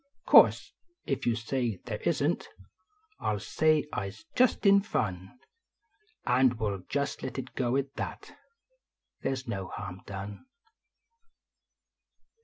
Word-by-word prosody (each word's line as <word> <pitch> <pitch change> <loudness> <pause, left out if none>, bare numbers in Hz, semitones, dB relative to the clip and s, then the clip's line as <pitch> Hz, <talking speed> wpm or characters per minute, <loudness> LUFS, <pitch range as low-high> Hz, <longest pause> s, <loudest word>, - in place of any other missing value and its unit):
Course, - - +6 0.4
if 135 - -1
you 120 - +3
say 115 -2 -2
they - - -4
isn - - +2
t, - - -14 0.7
I - - 0
ll 105 - -2
say 155 +7 +2
I 100 - -2
s 100 - -11
just 250 -3 +3
in 200 0 +7
fun. 95 - -2 1.0
And 125 -1 +3
we 110 - 0
ll 100 -1 -3
just 140 0 -1
let 130 0 -5
it 130 -1 -6
go 125 0 0
at 140 0 -2
that - - -6 0.9
Thev 135 - 0
s 130 -1 -6
no 95 -5 -3
harm 95 -2 -7
done. 100 - -7
125 Hz, 140 wpm, -29 LUFS, 100-135 Hz, 1.0 s, in